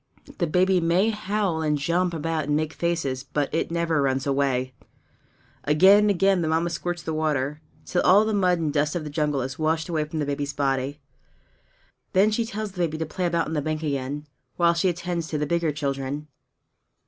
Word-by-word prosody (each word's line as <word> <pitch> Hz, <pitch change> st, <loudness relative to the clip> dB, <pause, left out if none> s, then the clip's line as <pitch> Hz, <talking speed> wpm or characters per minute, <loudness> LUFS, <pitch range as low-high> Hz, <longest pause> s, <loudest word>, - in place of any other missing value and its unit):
The 175 Hz, -, +1 dB
baby 180 Hz, +3 st, +3 dB
may 180 Hz, +6 st, +2 dB
howl 205 Hz, -5 st, -1 dB
and 150 Hz, -1 st, +1 dB
jump 170 Hz, +5 st, 0 dB
about 160 Hz, -1 st, -2 dB
and 145 Hz, 0 st, 0 dB
make 155 Hz, +1 st, -1 dB
faces, 165 Hz, -7 st, -1 dB
but 145 Hz, 0 st, -2 dB
it 165 Hz, -, 0 dB
never 165 Hz, -2 st, 0 dB
runs 135 Hz, -1 st, 0 dB
away! 135 Hz, -2 st, 0 dB, 0.9 s
Again 190 Hz, +8 st, +6 dB
and -, -, +3 dB
again 195 Hz, -1 st, +3 dB
the 160 Hz, -, 0 dB
Mamma 165 Hz, +2 st, +1 dB
squirts 175 Hz, -1 st, -3 dB
the 160 Hz, -, -3 dB
water, 150 Hz, -1 st, -1 dB, 0.2 s
till 180 Hz, -, 0 dB
all 205 Hz, +4 st, +5 dB
the 220 Hz, -, -1 dB
mud 180 Hz, -3 st, +3 dB
and 155 Hz, -3 st, -2 dB
dust 150 Hz, +1 st, +1 dB
of 170 Hz, -, -2 dB
the 150 Hz, -, -6 dB
jungle 150 Hz, -3 st, 0 dB
is 130 Hz, +2 st, -6 dB
washed 160 Hz, +2 st, 0 dB
away 155 Hz, -3 st, 0 dB
from 155 Hz, +1 st, -6 dB
the 150 Hz, -, 0 dB
baby's 140 Hz, 0 st, -3 dB
body. 135 Hz, +1 st, -1 dB, 1.1 s
Then 200 Hz, +3 st, +4 dB
she 230 Hz, +2 st, 0 dB
tells 215 Hz, -1 st, -5 dB
the 185 Hz, -, -11 dB
baby 160 Hz, -2 st, 0 dB
to 160 Hz, -, -2 dB
play 180 Hz, +3 st, -2 dB
about 170 Hz, -1 st, 0 dB
on 160 Hz, -, -5 dB
the 150 Hz, -, 0 dB
bank 155 Hz, +1 st, -3 dB
again, 140 Hz, 0 st, -3 dB, 0.3 s
while 170 Hz, -1 st, +3 dB
she 170 Hz, +2 st, +1 dB
attends 175 Hz, -1 st, -3 dB
to 155 Hz, -, -2 dB
the 150 Hz, -, -1 dB
bigger 170 Hz, 0 st, 0 dB
children. 140 Hz, 0 st, -3 dB
160 Hz, 205 wpm, -25 LUFS, 145-175 Hz, 1.1 s, Again